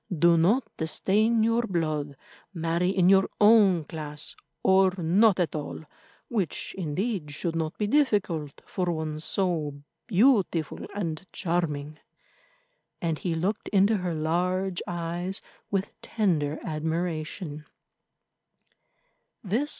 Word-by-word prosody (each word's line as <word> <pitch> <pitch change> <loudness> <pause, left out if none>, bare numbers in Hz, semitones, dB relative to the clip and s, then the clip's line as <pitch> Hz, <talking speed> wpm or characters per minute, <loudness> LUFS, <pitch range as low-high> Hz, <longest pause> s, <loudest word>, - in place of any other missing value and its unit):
"Do 170 +2 +5
not 195 +11 +3 0.2
stain 215 +7 +2
your 230 +1 +3
blood. 155 - -2 0.4
Marry 170 +2 0
in 185 -2 +3
your 190 0 +5
own 205 -5 +6
class, 150 -1 -6 0.3
or 190 0 +5
not 185 +4 +4
at 175 - +1
all, 155 +1 -5 0.4
which, 200 -9 -2
indeed, 185 0 -2
should 165 +3 -3
not 160 -1 -2
be 210 - 0
difficult 200 - 0
for 180 -2 -1
one 155 -2 -3
so 155 -5 -1 0.2
beautiful 200 - +2 0.2
and 165 -6 -3
charming." 155 -4 -2 1.0
And 165 -3 -1
he 175 -3 -1
looked 195 +6 -2
into 205 +2 +3
her 180 -3 -2
large 180 +4 0
eyes 175 +2 -3 0.3
with 195 -1 -1
tender 170 -11 0
admiration. 160 0 -3
175 Hz, 110 wpm, -27 LUFS, 155-195 Hz, 1.0 s, own